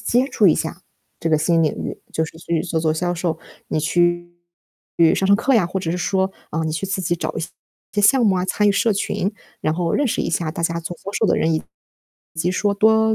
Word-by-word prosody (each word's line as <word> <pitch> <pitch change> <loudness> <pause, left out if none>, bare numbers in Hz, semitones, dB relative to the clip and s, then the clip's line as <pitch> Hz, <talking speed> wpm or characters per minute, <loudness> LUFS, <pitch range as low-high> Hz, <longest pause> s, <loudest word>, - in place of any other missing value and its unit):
接 250 +2 +2
触 215 -5 +3
一 165 - +6
下 165 +2 -4 0.4
这 165 - -2
个 155 - +4
新 165 +2 +2
领 155 - +2
域， - - -5
就 160 - 0
是 160 0 -10
去 165 -1 -1
做 165 -2 -2
做 155 -1 +1
销 175 +2 -1
售， 165 -2 -2 0.3
你 - - -1
去 175 +2 +1 0.8
上 190 - 0
上 200 - +6
课 245 +5 +1
呀， 220 -8 +4
或 190 +2 -3
者 165 - -2
是 180 - -2
说， 190 +1 0 0.2
啊， 160 +1 -1
你 160 - -2
去 175 +5 -3
自 190 0 -2
己 175 0 +1
找 - - -3
一 - - -2 0.5
些 205 - 0
项 245 +4 +5
目 195 -3 +3
啊， 180 - 0
参 210 +2 +2
与 - - +4
社 220 +2 +2
群。 195 0 -1 0.3
然 155 - 0
后 170 0 -1
认 290 - +2
识 - - -1
一 - - -1
下 165 -1 -1
大 170 - -5
家 170 0 0
做 170 +1 -6
销 200 - -5
售 220 - +1
的 - - +2
人， 160 - +1
以 155 - 0 0.7
及 165 +2 0
说 200 +2 +1
多 220 +2 +4
175 Hz, 265 characters per minute, -21 LUFS, 165-200 Hz, 0.8 s, 一